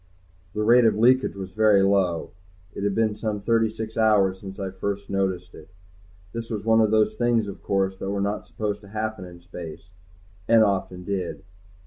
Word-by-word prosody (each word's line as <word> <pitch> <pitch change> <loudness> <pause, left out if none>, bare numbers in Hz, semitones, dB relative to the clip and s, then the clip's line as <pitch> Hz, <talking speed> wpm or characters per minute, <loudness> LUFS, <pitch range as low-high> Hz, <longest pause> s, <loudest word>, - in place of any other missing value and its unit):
The 105 - 0
rate 120 +2 +6
of 110 - +3
leakage 125 +2 +3
was 95 -1 -7
very 105 -2 +4
low. 95 -4 +1 0.4
It - - -5
had 100 -1 0
been 110 -2 +1
some 105 -1 -3
thirty 115 +2 +2
six 110 0 -6
hours 100 -4 +3
since 95 +1 -9
I'd 95 -1 -5
first 100 +1 -3
noticed 95 -2 -1
it. 75 - -13 0.6
This 115 0 -5
was 105 -2 -4
one 115 0 +5
of 110 - +3
those 110 0 +3
things, 115 -1 +1
of 100 - -8
course, 95 -1 -1
that 95 - -4
were 100 0 -2
not 100 +1 -2
supposed 105 -1 -3
to 100 - -14
happen 110 -1 -4
in 90 -1 -12
space, 85 0 -10 0.6
and 115 -1 +6
often 95 -3 -1
did. 95 -2 -4
100 Hz, 190 wpm, -24 LUFS, 95-110 Hz, 0.6 s, rate